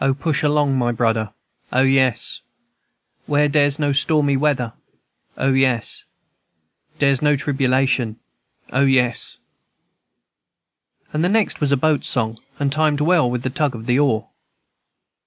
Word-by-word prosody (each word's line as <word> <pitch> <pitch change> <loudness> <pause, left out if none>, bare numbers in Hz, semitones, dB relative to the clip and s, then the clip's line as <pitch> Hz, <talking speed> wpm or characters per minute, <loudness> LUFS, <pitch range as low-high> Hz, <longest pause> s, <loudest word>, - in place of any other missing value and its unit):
O, 135 0 +2
push 150 +1 -1
along, 145 -3 +1
my 120 -1 +1
brudder, 110 -2 -1 0.4
O, 130 +1 +3
yes, 130 -2 +1
&c. - - -35 0.9
Where 150 0 +2
dere's 145 -1 +2
no 145 -2 0
stormy 145 0 +2
weather, 135 -5 0 0.6
O, 135 +1 +1
yes, 130 -3 +1
&c. - - -4 0.9
Dere's 140 -2 +2
no 150 -1 +3
tribulation, 130 -4 0 0.6
O, 130 - +2
yes, 125 -3 0 1.8
&c. 155 - -1
This 175 +4 +1
next 220 -1 +1
was 145 -2 0
a 140 - +3
boat 150 0 +1
song, 110 -2 -2 0.2
and 140 -1 -1
timed 155 0 +1
well 160 -4 +3
with 125 0 -3
the 130 - -2
tug 145 -1 -1
of 110 0 -9
the 125 +2 +1
oar. 125 -7 +1
135 Hz, 145 wpm, -20 LUFS, 125-145 Hz, 1.8 s, O